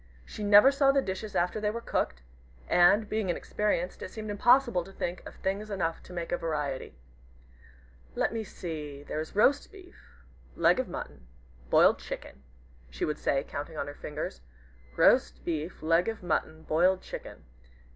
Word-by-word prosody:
She 210 - -7
never 205 +6 +8
saw 275 -1 +4
the 275 - +3
dishes 200 -2 -4
after 180 +5 0
they 210 - +1
were 225 +2 -3
cooked; 65 - -2 0.4
and, 200 +5 +5
being 215 -3 -1
inexperienced, 180 0 -1
it - - -5
seemed 215 +2 -6
impossible 240 -2 +4
to 195 - -13
think 180 -2 -4
of - - -11
things 200 +3 -3
enough 175 -5 -2
to - - -15
make 170 -2 -5
a 175 - +1
variety. 150 - -3 1.2
"Let - - 0
me 225 -1 -2
see 150 -7 -7
there 150 - -4
is 155 +4 -6
roast 280 +7 +3
beef 360 - -17 0.3
leg - - +4
of - - -1
mutton 65 -4 -8 0.4
boiled - - +5
chicken," 65 - -8 0.5
she - - -3
would 150 - -3
say, 135 - +1
counting 150 +2 -6
on - - -2
her 145 - -7
fingers, 150 - -6 0.6
"roast - - +4
beef 160 0 -4
leg 165 +2 +3
of 225 -3 -4
mutton 160 -2 -2
boiled 180 +5 +2
chicken. - - -9
180 Hz, 165 wpm, -29 LUFS, 155-215 Hz, 1.2 s, never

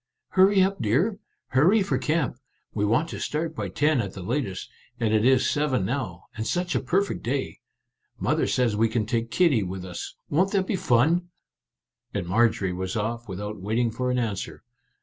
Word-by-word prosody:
" - - -57
Hurry 190 0 +5
up, 195 +1 -1
dear! 170 - +1 0.3
Hurrah 180 +11 +4
for 195 - 0
camp! 150 -5 0 0.3
We 105 -1 0
want 120 +10 +2
to - - -6
start 160 +1 -2
by - - -3
ten 150 -3 +2
at 100 -3 -5
the 95 - -7
latest, 105 -3 -2 0.3
and 110 -2 +1
it 110 -1 +3
is 130 +1 +4
seven 140 -9 +1
now, 95 -8 -3
and 110 0 -3
such 175 +8 -1
a - - +2
perfect 195 +3 0
day. 130 +3 -2 0.6
Mother - - +1
says 120 -4 +1
we 115 +2 +2
can 110 -1 0
take 115 +1 -1
Kitty 150 -7 +3
with 95 -1 -5
us; 90 -2 -7
won't 185 +7 +1
that 195 -2 +2
be 200 - -1
fun? 170 +5 +2 0.4
" - - -52
And - - -1
Marjorie 95 -1 +2
was 95 +1 -4
off 115 +1 -3
without 105 +2 -5
waiting 115 +4 0
for 125 +3 -2
an 125 - +1
answer. 110 -6 -3
120 Hz, 190 wpm, -25 LUFS, 105-160 Hz, 0.6 s, Hurry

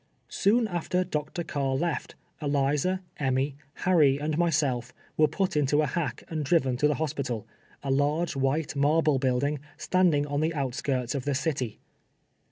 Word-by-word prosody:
Soon 225 +3 +2
after 180 0 -1
Dr. 155 0 -3
Carr 135 -4 -1
left, 165 +3 -2 0.3
Eliza, 145 +6 +1
Emmy, 135 0 0 0.3
Harry 155 -7 +5
and 150 +1 -2
myself 145 -7 +1 0.2
were 155 - +5
put 185 +5 -1
into 145 +1 +3
a - - +2
hack 150 +4 -2
and 155 -2 -3
driyen 135 -4 +2
to 150 - +4
the 150 - +1
hospital 135 -8 -3 0.2
— - - -30
a 135 - -1
large 145 +5 +1
white 140 +3 0
marble 150 0 +3
building, 135 +3 +1 0.2
standing 175 -6 +2
on 145 0 -2
the 160 +1 0
outskirts 130 -2 -1
of 135 -3 -3
the 145 -1 0
city. 130 -6 -2
145 Hz, 160 wpm, -27 LUFS, 135-160 Hz, 0.3 s, Harry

